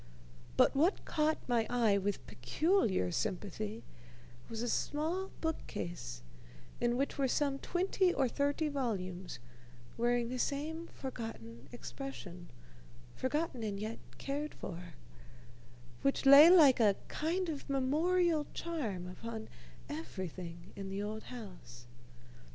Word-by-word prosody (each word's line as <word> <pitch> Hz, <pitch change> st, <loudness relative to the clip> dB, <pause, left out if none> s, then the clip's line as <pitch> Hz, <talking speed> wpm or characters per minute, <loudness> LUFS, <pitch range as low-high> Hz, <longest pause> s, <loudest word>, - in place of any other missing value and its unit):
But -, -, +5 dB
what 330 Hz, +8 st, +2 dB
caught 310 Hz, 0 st, +2 dB
my 235 Hz, -3 st, +2 dB
eye 225 Hz, -5 st, +3 dB
with 200 Hz, 0 st, -2 dB
peculiar 125 Hz, -, +1 dB
sympathy 210 Hz, -, -3 dB, 0.7 s
was 230 Hz, 0 st, -3 dB
a -, -, -1 dB
small 325 Hz, +10 st, -1 dB
bookcase, 175 Hz, -, -4 dB, 0.6 s
in 240 Hz, 0 st, +2 dB
which 275 Hz, +1 st, -1 dB
were 270 Hz, -, +3 dB
some 275 Hz, +1 st, +1 dB
twenty 370 Hz, +2 st, +2 dB
or 270 Hz, -6 st, +2 dB
thirty 285 Hz, +5 st, 0 dB
volumes, 190 Hz, -, -3 dB, 0.6 s
wearing 240 Hz, 0 st, +2 dB
the 255 Hz, 0 st, -3 dB
same 315 Hz, +6 st, -2 dB
forgotten 135 Hz, -, -7 dB
expression 200 Hz, -9 st, -7 dB, 0.7 s
forgotten 280 Hz, -1 st, -1 dB
and 205 Hz, -3 st, -2 dB
yet 215 Hz, +2 st, -4 dB, 0.2 s
cared 290 Hz, +2 st, -3 dB
for 170 Hz, -3 st, -7 dB, 1.1 s
which 275 Hz, 0 st, +1 dB
lay 280 Hz, +4 st, +11 dB
like 305 Hz, -9 st, +8 dB
a 210 Hz, -4 st, +5 dB
kind 350 Hz, +4 st, -1 dB
of 300 Hz, -3 st, -5 dB
memorial 310 Hz, +4 st, +2 dB
charm 235 Hz, -, -3 dB
upon 220 Hz, +4 st, -6 dB, 0.4 s
everything 170 Hz, -, -6 dB
in 195 Hz, -1 st, -5 dB
the 195 Hz, +1 st, -3 dB
old 215 Hz, +1 st, -5 dB
house. 175 Hz, -, -10 dB
240 Hz, 115 wpm, -34 LUFS, 195-295 Hz, 1.1 s, lay